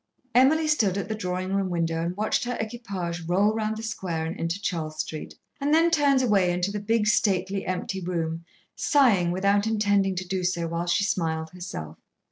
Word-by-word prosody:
Emily 305 +6 +4
stood 215 -11 +2
at 200 0 -3
the - - 0
drawing 185 -2 -3
room 195 -1 0
window 165 -2 -1
and 175 +2 -3
watched 215 +1 0
her 245 0 -2
equipage 195 -7 -4
roll 200 +5 +3
round 220 0 -2
the 220 - -6
square 180 -7 -3
and 165 - -4
into 165 +3 -2
Charles 160 -6 -3
Street, 155 -1 -5 0.2
and 285 +1 0
then 335 +1 +4
turned 285 -4 +3
away 195 -6 +3
into 180 +2 -1
the 210 - -3
big, 215 +1 +1
stately 195 -2 +1
empty 185 +1 -3
room, 165 -2 -3 0.3
sighing 235 - +3
without 200 +4 +2
intending 205 -3 +2
to 185 0 -4
do 185 0 -2
so 175 -2 0
while 170 +1 -3
she 175 +3 +2
smiled 160 -5 -1
herself. 80 - -7
190 Hz, 190 wpm, -26 LUFS, 175-215 Hz, 0.3 s, Emily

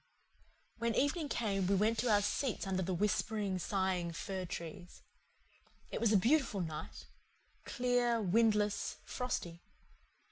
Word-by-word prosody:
When 230 0 0
evening 290 +2 +1
came 200 -7 0
we 200 - +3
went 220 +3 +2
to 245 - +1
our 205 -1 +4
seats 245 +2 -1
under 190 -1 -1
the 185 +1 -2
whispering, 205 0 0
sighing 185 -3 -1
fir 190 +2 -4
trees. 175 +1 -8 0.9
It - - -3
was 230 -2 +3
a 210 - +6
beautiful 235 -2 +2
night 160 -3 -6 0.6
clear, 245 -2 +1
windless, 210 +1 +2
frosty. 175 -9 -4
205 Hz, 130 wpm, -34 LUFS, 185-235 Hz, 0.9 s, a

